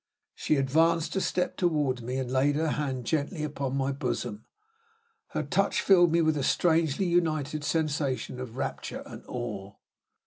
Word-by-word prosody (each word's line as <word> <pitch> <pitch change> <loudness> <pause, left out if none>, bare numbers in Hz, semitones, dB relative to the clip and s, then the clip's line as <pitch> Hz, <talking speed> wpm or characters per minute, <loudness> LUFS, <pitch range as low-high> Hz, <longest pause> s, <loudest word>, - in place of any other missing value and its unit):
She 155 - 0
advanced 160 +5 +2
a 190 - +1
step 180 -1 -1
toward 150 -8 +1
me, 125 +3 -3
and 130 -2 -3
laid 135 +2 +2
her 160 +1 +1
hand 135 -5 -2
gently 155 +2 -1
on 135 -2 -3
my 135 0 0
bosom. 125 -5 -3 0.8
Her - - -3
touch - - +1
filled 175 -4 +5
me 170 0 +3
with 155 -3 +1
strangely 165 +2 +2
united 155 -4 0
sensations 145 -5 -1
of 125 -1 -7
rapture - - -4
and - - -10
awe. 105 -5 -5
145 Hz, 150 wpm, -28 LUFS, 130-160 Hz, 0.8 s, filled